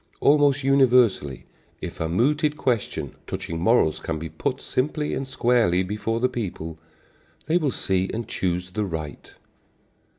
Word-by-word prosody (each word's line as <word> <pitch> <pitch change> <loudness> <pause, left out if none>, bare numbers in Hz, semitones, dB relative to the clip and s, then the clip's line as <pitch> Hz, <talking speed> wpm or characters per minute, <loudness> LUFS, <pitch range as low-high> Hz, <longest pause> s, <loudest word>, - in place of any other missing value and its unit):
Almost 145 -1 +4
universally, 125 - +3 0.3
if - - -7
a 80 - -1
mooted 150 - +1
question 120 -7 -1
touching 85 0 -4
morals 90 -4 +3
can 80 - -3
be 80 +1 -6
put - - -3
simply 150 +3 -1
and 135 - -3
squarely 120 -8 +2
before 105 +4 -2
the 125 - +3
people, 90 -10 -5 0.7
they 165 - +2
will 150 -4 +1
see 95 -6 0
and 115 0 -4
choose 90 0 -2
the 105 +2 -1
right. 80 -6 -6
115 Hz, 140 wpm, -24 LUFS, 90-135 Hz, 0.7 s, Almost